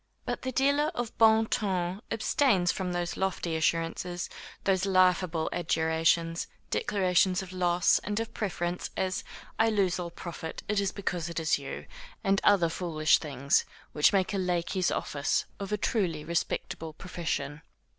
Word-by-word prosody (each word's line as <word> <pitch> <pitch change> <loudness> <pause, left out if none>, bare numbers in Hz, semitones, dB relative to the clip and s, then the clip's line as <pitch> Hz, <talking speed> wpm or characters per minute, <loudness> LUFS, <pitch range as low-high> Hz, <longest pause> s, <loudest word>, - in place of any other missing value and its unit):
But - - -3
the 260 - -3
dealer 280 +4 +2
of 240 -1 -3
bon 220 0 +6
ton 190 -3 -1
abstains 215 -5 +2
from 185 -2 -3
those 175 -1 -2
lofty 190 -3 -1
assurances, 165 +2 -1 0.3
those 195 0 +2
laughable 185 -3 +3
adjurations, 165 0 +1 0.2
declarations 185 - +2
of 185 -1 -10
loss, 180 -1 +3
and 210 +1 -2
of 225 -1 -4
preference, 180 -4 -2
as, 185 0 -1 0.4
I 225 0 +5
lose 195 -4 +1
all 175 -1 -3
profit, 165 -1 -7
it 210 -1 +1
is 200 -1 0
because 180 -4 -3
it 170 - -3
is 160 -2 +1
you, - - -6 0.4
and 195 0 +2
other 195 -5 +5
foolish 160 -3 +2
things, 140 -2 +1 0.3
which 150 - +4
make 195 0 +1
a 195 - 0
lackey's 180 0 0
office 140 -1 -1
of 200 0 -5
a 210 - +1
truly 175 -8 -1
respectable 165 -1 -2
profession. 160 -3 -4
180 Hz, 150 wpm, -29 LUFS, 165-200 Hz, 0.4 s, bon